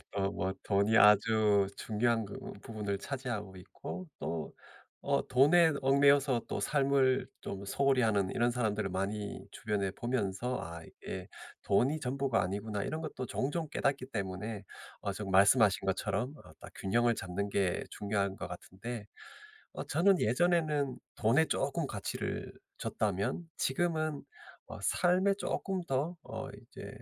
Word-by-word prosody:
어 100 -1 +1
뭐 95 -1 -2
돈이 100 +2 +3
아주 105 -1 +5
중요한 115 +1 +1
그 100 - -8 0.3
부분을 105 -3 -3
차지하고 115 -7 -4
있고 180 - -8
또 80 -1 -4 0.5
어 - - +1
돈에 160 +6 +6
얽매여서 140 -1 +4
또 - - -2
삶을 135 -2 +2
좀 100 0 -6
소홀히 135 +5 +2
하는 100 -4 +2
이런 120 +1 +2
사람들을 110 -4 0
많이 100 +2 -3
주변에 100 -3 -2
보면서 120 +1 -2
아 85 0 -7
'이게 - - -8 0.3
돈이 135 +10 +2
전부가 130 -3 0
아니구나.' 100 +2 -2
이런 155 - -3
것도 155 -5 -5
종종 145 +5 -2
깨닫기 135 -1 0
때문에 100 0 -4 0.4
어 100 - -2
지금 100 0 -5
말씀하신 100 +1 +5
것처럼 100 +6 -1
어 - - -14
딱 - - -10
균형을 120 +4 +2
잡는 95 +2 -3
게 95 -3 +1
중요한 100 -2 -1
것 - - -6
같은데 110 +3 -7 0.7
어 - - -4
저는 180 +4 +3
예전에는 150 +1 +2 0.2
돈에 125 +9 +4
쪼끔 145 +1 -1
가치를 100 -6 -4 0.2
줬다면 105 - -1
지금은 155 0 0 0.5
어 - - -8
삶에 185 +3 +3
쪼끔 190 -2 -2
더 140 +6 0
어 - - -6
이제 - - -11
115 Hz, 285 characters per minute, -32 LUFS, 100-140 Hz, 0.7 s, 돈에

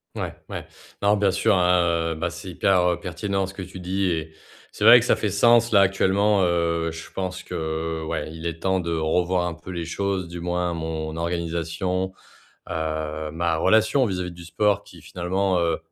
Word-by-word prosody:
Ouais, - - -3 0.2
ouais. - - -5 0.4
Non, 105 +1 +4
bien 100 -1 +3
sûr, 95 - +2
hein, 85 -2 +2
heu, - - -7
bah, 85 +2 -2
c'est 85 +2 -8
hyper, 90 +1 +2
heu, 85 - -5
pertinent 95 +2 -2
ce 95 - -9
que 95 - -7
tu 95 0 -8
dis 95 +2 -1
et 80 -2 -3 0.4
c'est - - -6
vrai - - +10
que - - -2
ça - - +4
fait - - -1
sens 120 0 +4
là 100 -3 +6
actuellement, 100 +1 +3
heu, 85 -1 +1
je 80 0 -9
pense 95 -1 -4
que, 80 0 -3
ouais, 80 - -3
il 80 +1 -5
est 85 -1 -4
temps 95 0 +2
de 85 -2 -3
revoir 85 +3 +1
un 85 - -3
peu 80 +2 -13
les 85 -2 -4
choses, 95 +2 -2
du 85 +1 -7
moins 90 0 -1
mon 80 -1 -4
organisation, 85 +2 -2 0.6
heu, 80 -1 -3
ma 85 +1 0
relation 110 - +3
vis-à-vis 90 -5 -2
du 85 0 -11
sport 105 +4 +1
qui - - -15
finalement, 95 +1 -1
heu, 85 -1 +1
85 Hz, 195 wpm, -24 LUFS, 80-95 Hz, 0.6 s, vrai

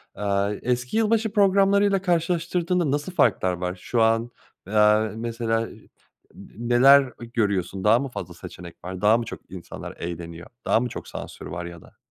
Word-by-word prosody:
Aaa, 100 0 0
eski 125 - -1
yılbaşı 220 -1 +2
programlarıyla 200 -1 +4
karşılaştırdığında 175 -2 0
nasıl 145 +5 -2
farklar 95 - +2
var 90 +1 -3
şu 120 -2 0
an, 115 +1 +2 0.4
aaa, 105 +1 +4
mesela, 115 0 -1
n - - -12 0.6
n 120 +3 -9
neler, 135 +4 +7 0.2
eee, 120 - -7
görüyorsun, 100 -4 -1
daha 110 +3 +5
mı 140 - -3
fazla - - -7
seçenek 85 -1 -10
var, 95 +1 -6
daha 110 +2 +5
mı 120 - -3
çok - - -7
insanlar 90 -2 -9
eğleniyor, 85 0 -7 0.2
daha - - +3
mı 125 0 -2
çok - - -8
sansür - - -8
var 85 -1 -5
ya 85 -1 -9
da? - - -19
115 Hz, 170 wpm, -24 LUFS, 100-165 Hz, 0.6 s, neler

